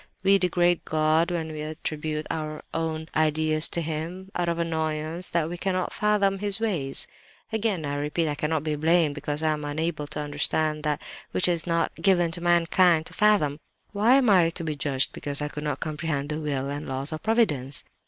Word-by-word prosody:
We 195 +1 +5
degrade 175 -1 +2
God 155 +2 +2
when 165 -2 -3
we 155 -1 -6
attribute 155 0 -4
our 155 -1 -4
own 160 -1 -2
ideas 155 0 +3
to 170 - -1
Him, 165 +5 -5
out 175 -1 -1
of 170 - -1
annoyance 160 +1 -2
that 170 -2 0
we 175 +2 -5
cannot 185 -1 -1
fathom 200 -2 +1
His 205 0 0
ways. 175 -12 +1 0.5
"Again, 210 -7 0
I 140 - -3
repeat, 150 +3 -1
I 150 - 0
cannot 150 +1 -1
be 155 -1 -1
blamed 160 0 +3
because 145 +1 -3
I 155 - +3
am 150 -1 -3
unable 150 +1 -2
to 150 - -4
understand 150 +1 0
that 150 -1 -1 0.3
which 185 - +4
it - - +3
is 170 0 -2
not 165 -1 +1
given 175 -4 +3
to 170 0 -2
mankind 175 -1 +3
to - - -11
fathom. 200 -9 +2 0.3
Why 215 +5 +4
am 270 -2 +4
I 175 -4 +5
to 170 0 -5
be 155 -1 -2
judged 140 -2 -1
because 145 -1 -3
I 150 0 -2
could 150 0 -7
not 150 -1 -2
comprehend 150 -2 -3
the 150 0 -2
Will 140 -3 -2
and 145 0 -5
Laws 135 +3 0
of 155 - -5
Providence? 170 - +2
160 Hz, 200 wpm, -26 LUFS, 150-175 Hz, 0.5 s, We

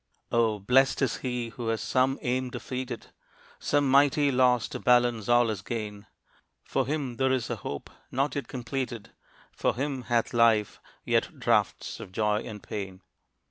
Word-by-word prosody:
Oh, 115 -2 +2
blest 130 +8 +3
is 130 - 0
he 125 -2 -3
who 115 0 -6
has 115 -1 0
some 130 +1 +1
aim 125 +1 0
defeated; 125 -1 -6 0.5
Some 145 -1 +1
mighty 140 +1 +4
loss 125 -2 +3
to - - -5
balance 120 -3 +3
all 120 -1 +5
his 105 -3 -3
gain. 105 -2 -5 0.6
For 135 -2 -1
him 140 -5 -2
there 130 0 +2
is 125 -2 -1
a 120 - -2
hope 70 -7 -6 0.2
not 135 +1 0
yet 140 - -3
completed; 125 -2 -4 0.4
For - - 0
him 135 +1 -2
hath 120 -1 0
life 115 -3 +3 0.2
yet - - 0
draughts - - +1
of - - -9
joy 105 +1 +1
and 105 -3 -8
pain. 95 -2 -6
120 Hz, 160 wpm, -28 LUFS, 110-130 Hz, 0.6 s, all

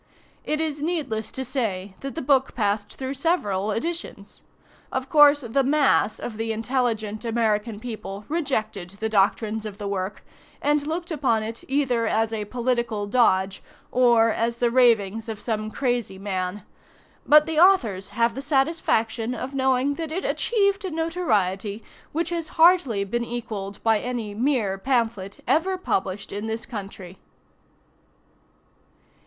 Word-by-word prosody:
It 305 - -1
is 305 -2 -2
needless 285 -10 -2
to 265 - -4
say 205 -7 -2
that 275 0 -6
the 320 - -3
book 270 0 +2
passed 205 -2 -1
through 265 0 -4
several 235 - 0
editions. 230 -4 -5 0.5
Of 260 0 -3
course, 295 -1 +7
the 260 +3 0
mass 280 -5 +3
of 220 -3 -6
the 225 0 -2
intelligent 225 -2 -1
American 225 -2 0
people 215 -3 -7
rejected 220 - -2
the 220 - -1
doctrines 215 +1 +1
of 210 -2 -7
the 205 -1 -5
work, 195 0 -4 0.3
and 295 0 +1
looked 340 +2 -3
upon 260 -8 +1
it 225 +1 -6
either 255 -4 +1
as 225 +1 +1
a 215 -2 -2
political 235 -2 -1
dodge, 195 -4 +2 0.3
or 235 -2 +4
as 230 +1 -1
the 240 -1 +1
ravings 225 -3 +3
of 220 -2 -5
some 215 -2 -2
crazy 245 -5 -1
man; 190 0 -3 0.6
but 300 0 +7
the 320 -1 0
authors 240 - +4
have 230 0 +1
the 270 - -5
satisfaction 270 -5 0
of 255 +3 -5
knowing 265 +1 +2
that 320 -1 -4
it 370 +4 -3
achieved 400 -3 +1
a 380 - -2
notoriety 225 - -1 0.3
which 335 +2 -1
has 335 -2 -2
hardly 320 - +5
been 235 +4 -2
equalled 220 -5 -5
by 225 -2 +3
any 235 -3 -4
mere 220 -5 0
pamphlet 225 -5 -1
ever 370 +4 +2
published 195 - -2
in 205 +2 -4
this 225 +1 -3
country. 195 -5 -8
235 Hz, 145 wpm, -24 LUFS, 210-280 Hz, 0.6 s, course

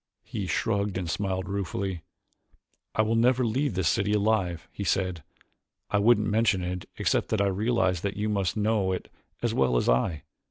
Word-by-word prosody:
He 110 -4 -4
shrugged 100 -1 0
and 90 -2 -3
smiled 95 +1 -2
ruefully. 95 -2 -3 0.9
"I 110 - +3
will 110 +1 0
never 125 +2 +3
leave 130 +1 0
this 95 -3 +1
city 105 +2 +1
alive," 100 -5 +1
he 100 - -5
said. 90 -3 0 0.7
"I 105 - +3
wouldn't 105 0 +4
mention 105 -3 +2
it 90 0 -4
except - - +1
that 110 - 0
I 100 - +3
realize 100 -2 +1
that 100 0 -3
you 105 +1 -1
must 100 -3 0
know 105 -3 +1
it 90 - -6 0.3
as - - +1
well 65 -2 +2
as - - 0
I. 70 +5 +1
100 Hz, 175 wpm, -27 LUFS, 90-110 Hz, 0.9 s, wouldn't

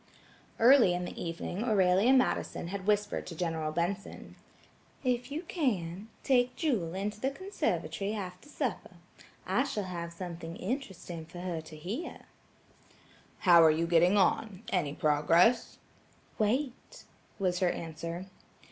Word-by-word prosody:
Early 235 -6 +6
in 180 0 -3
the - - -7
evening 170 +4 -4
Aurelia 200 0 +4
Madison 255 -9 +1
had 195 0 -5
whispered 210 0 +1
to 170 - -7
General 160 -2 -2
Benson: 175 +5 -3 0.7
"If 250 0 0
you 310 +4 -3
can, 215 - -2 0.2
take 250 -2 +3
Jewel 205 - -1
into 205 +2 -3
the 265 - +1
conservatory 275 - -2
after 185 +4 -7
supper. 250 -10 -3 0.5
I 195 +8 +2
shall 215 -7 -3
have 170 -2 -5
something 170 -1 -7
interesting 185 - -5
for 175 +1 -9
her 175 -3 -3
to 155 0 -12
hear." 195 - -5 1.2
"How 170 -3 +7
are 160 - +7
you 160 +2 +2
getting 175 +4 +4
on? 200 +1 +1
Any 150 -6 0
progress?" 165 +9 +3 0.6
"Wait," 255 - -1 0.3
was 180 -3 0
her 185 - +3
answer. 165 +2 -5
185 Hz, 130 wpm, -30 LUFS, 170-235 Hz, 1.2 s, How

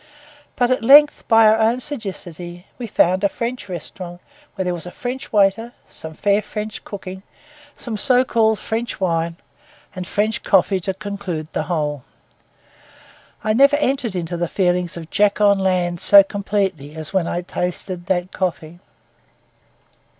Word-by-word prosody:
But 245 0 +1
at 255 - +1
length, 290 +4 +6
by 225 -1 +6
our 215 +1 +5
own 225 +3 +2
sagacity, 185 - -6
we 240 - -4
found 185 -1 +2
a 200 - +4
French 235 -1 -5
restaurant, 175 0 -7 0.4
where 190 -2 -2
there 180 - 0
was 175 0 -6
a - - -7
French 250 +6 -6
waiter, 210 +3 +2
some 160 0 -8
fair 205 +3 +2
French 210 0 -6
cooking, 190 -2 -8 0.6
some 235 -3 -5
so 255 +3 +3
called 220 -3 +2
French 225 +2 -4
wine, 165 -2 0 0.6
and 185 -1 -5
French 210 +3 -1
coffee 195 0 +3
to 190 +1 -3
conclude 195 -6 -5
the - - 0
whole. 150 -5 -1 1.4
I 215 - +1
never 275 +5 +5
entered 270 -7 0
into 175 -1 -3
the 175 0 -1
feelings 180 -1 0
of 165 -1 -9
Jack 205 0 +2
on 200 -1 +4
land 180 -2 0
so 200 +2 +7
completely 195 -7 -2
as 160 +2 -7
when 185 -3 +1
I 175 - -2
tasted 180 0 -4
that 180 -1 -1
coffee. 175 -2 -3
195 Hz, 155 wpm, -20 LUFS, 175-220 Hz, 1.4 s, so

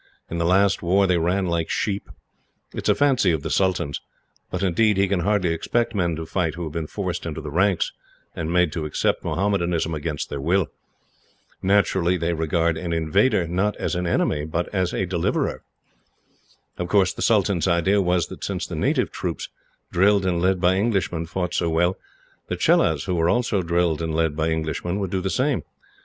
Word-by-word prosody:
In 85 - -2
the 85 - +1
last 95 +3 +3
war 95 +3 +3
they 90 -2 +2
ran 90 +4 +1
like 85 -2 -1
sheep. 100 -1 -2 0.6
It - - -6
is - - +1
a - - +5
fancy 135 -8 +3
of 80 -3 -1
the - - -3
sultan's. 85 -7 0 0.5
But, 90 +1 -3
indeed, 105 +3 +2
he 100 0 +3
can 95 -1 0
hardly 90 -2 +1
expect 120 +8 -1
men 85 -5 0
to 80 +1 -5
fight 80 -2 -1
who 85 - -5
have 80 - -5
been 80 0 -4
forced 90 -3 -4
into 80 - -4
the 75 -2 -6
ranks, 95 +3 +2 0.4
and 80 0 -3
made 90 -2 +3
to 80 -2 -3
accept 75 - 0
Mohammedanism 85 -4 0
against 75 -1 -4
their 70 - -3
will. 90 +4 +1 0.9
Naturally 95 -2 +2
they 85 0 -1
regard 80 +1 0
an 85 0 -3
invader, 85 +4 +2
not 95 +5 0
as - - -3
an 90 0 -1
enemy, 75 -2 +1
but 80 +3 -2
as 95 -3 0
a 95 - -1
deliverer. 90 -2 -1 1.2
"Of 90 - -2
course 95 0 +3
the - - -8
sultan's 100 -5 +2
idea 95 +3 +3
was, 90 -2 +1
that - - -9
since - - -2
the - - -6
native - - 0
troops, - - -4 0.4
drilled 100 +2 +3
and 90 -2 0
led 95 0 +2
by 90 +1 +3
Englishmen, 95 -6 0
fought 90 +1 -3
so 85 - 0
well; 85 +3 +2 0.5
the - - -3
Chelahs, 80 -4 +3
who 90 - -2
were 85 -1 +2
also 115 -4 +1
drilled 85 -2 0
and 80 -1 -2
led 80 -2 +1
by 80 +1 0
Englishmen, 80 +3 -2
would 95 -3 -3
do 95 - -1
the 95 - -2
same. 130 +5 +1
90 Hz, 195 wpm, -23 LUFS, 80-95 Hz, 1.2 s, a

